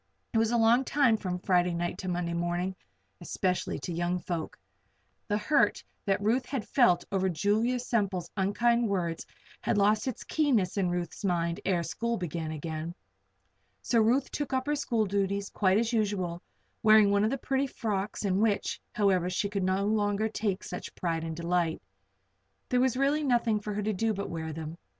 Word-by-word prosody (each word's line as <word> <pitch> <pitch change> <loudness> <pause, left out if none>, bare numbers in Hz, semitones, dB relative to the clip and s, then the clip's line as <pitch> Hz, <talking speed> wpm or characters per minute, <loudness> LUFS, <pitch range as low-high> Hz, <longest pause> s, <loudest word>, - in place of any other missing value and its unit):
It 225 - +3
is 225 0 +2
a 240 - +2
long 230 +3 +4
time 270 -4 +3
from 185 -4 -3
Friday 180 -1 +2
night 175 +1 -2
to 190 - -5
Monday 175 -1 -1
morning 175 +2 -1 0.5
especially 180 +1 -1
to 175 - -4
young 175 +2 0
folk. 170 -2 -4 0.7
The 205 - +1
hurt 215 +8 +2 0.2
that 200 +1 +1
Ruth 245 +4 +1
had 260 -6 -3
felt 180 -10 +3
over 190 -1 +1
Julia 210 +8 +1
Semple's 200 -8 -1
unkind 230 +4 +2
words 170 -4 -2 0.3
had 225 - 0
lost 210 +3 +3
its 255 - -4
keenness 250 - +1
in 190 -3 +1
Ruth's 175 +2 -4
mind 170 -1 0
ere 180 -3 +1
school 235 +8 -2
began 165 -2 -4
again. 160 +2 -5 0.9
So 230 - +3
Ruth 245 +5 +2
took 290 -2 -3
up 260 0 0
her 295 - 0
school 235 -6 0
duties 200 0 -1
quite 190 -1 +2
as 230 +2 0
usual, 195 -6 -1 0.4
wearing 215 -2 +6
one 200 0 +3
of 215 - +3
the 275 - -1
pretty 270 +1 0
frocks 210 -4 -3
in 190 -1 +1
which, 215 -2 0
however, 190 -4 +2
she 200 +3 -1
could 200 -1 -1
no 190 +2 +1
longer 210 0 +1
take 205 -3 -2
such 180 - -7
pride 165 -2 -2
and 160 -1 -4
delight. 170 0 0 0.9
There 250 - +2
was 255 -1 +2
really 285 +3 +2
nothing 235 -5 +2
for 210 0 -5
her 210 - -2
to 215 +1 0
do 220 +2 0
but 200 -1 -4
wear 160 -1 -4
them. 160 +2 -7
200 Hz, 180 wpm, -29 LUFS, 175-225 Hz, 0.9 s, wearing